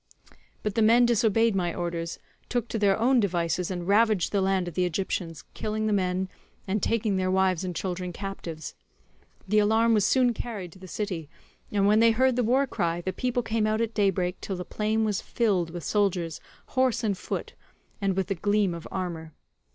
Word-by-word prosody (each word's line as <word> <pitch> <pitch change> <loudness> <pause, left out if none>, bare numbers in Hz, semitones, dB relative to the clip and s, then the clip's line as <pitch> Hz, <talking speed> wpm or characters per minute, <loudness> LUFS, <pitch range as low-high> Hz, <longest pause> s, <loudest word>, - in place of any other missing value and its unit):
"But 210 - -1
the 225 - +1
men 230 +3 +6
disobeyed 225 -1 +3
my 175 -3 0
orders, 170 -1 -3 0.3
took 240 -2 -1
to 225 - -2
their 200 -2 +3
own 250 +3 +3
devices, 175 -3 0
and 175 -2 -4
ravaged 210 -2 +3
the 200 - +1
land 190 -1 +1
of 175 - -5
the 180 - +1
Egyptians, 170 -3 -2
killing 215 0 -2
the 215 - +1
men, 185 -1 0 0.4
and 200 +2 0
taking 215 -2 +1
their 185 0 0
wives 190 -2 +2
and 180 -2 -4
children 180 0 -3
captives. 170 -5 -6 0.7
The 210 +2 +3
alarm 220 +2 +3
was 210 -2 +3
soon 250 +3 +3
carried 205 -7 -6
to 190 - -16
the 185 - -11
city, 180 -6 -4 0.4
and 200 -1 +2
when 210 +2 +5
they 230 0 +6
heard 255 +2 +3
the 250 - +1
war 260 +5 +3
cry, 170 -8 -1
the 185 +2 -3
people 250 +3 -1
came 225 -1 0
out 215 0 +1
at 230 -1 -1
daybreak 190 -4 0
till 195 - -4
the 180 0 -5
plain 220 +3 0
was 210 -3 -1
filled 195 -8 0
with 170 0 -7
soldiers 180 -6 0 0.3
horse 255 -3 +1
and 205 -3 +1
foot, - - -5 0.5
and 195 -1 0
with 190 - +1
the 195 - -1
gleam 205 0 +1
of 170 -1 -7
armour. 165 -4 -5
195 Hz, 200 wpm, -27 LUFS, 180-220 Hz, 0.7 s, men